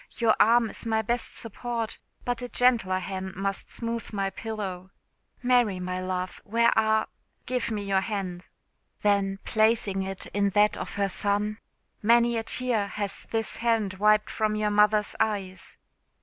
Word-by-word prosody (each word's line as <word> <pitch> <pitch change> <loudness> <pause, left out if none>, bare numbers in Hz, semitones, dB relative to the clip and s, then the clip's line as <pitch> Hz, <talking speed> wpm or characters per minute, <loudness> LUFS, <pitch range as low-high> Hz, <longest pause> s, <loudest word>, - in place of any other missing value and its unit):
Your 230 -2 +3
arm 230 -1 +5
is - - -7
my 220 -1 +1
best 235 +2 -2
support, 230 0 -3 0.3
but 245 0 -1
a 245 - -5
gentler 235 -8 +3
hand 190 0 -5
must 195 +1 -3
smooth 230 0 -4
my 195 -2 -1
pillow. 195 -5 -5 0.5
Mary, 245 -6 +3
my 180 0 -3
love, 185 0 -3
where 235 +2 +2
are? 220 0 +3 0.4
Give 250 -2 -1
me 210 -2 -2
your 195 -1 +1
hand." 190 -4 -4 0.6
Then 200 -1 +2
placing 215 -3 +2
it 190 0 -4
in 200 0 +2
that 210 0 +5
of - - -6
her 200 0 +1
son 205 +2 0 0.4
"Many 235 +2 +4
a 225 - 0
tear 225 -3 0
has 200 -1 -4
this 225 -1 -1
hand 225 -4 +1
wiped 210 0 +4
from 215 -1 0
your 210 0 0
mother's 210 0 +3
eyes!" 200 -4 -2
210 Hz, 155 wpm, -27 LUFS, 195-230 Hz, 0.6 s, arm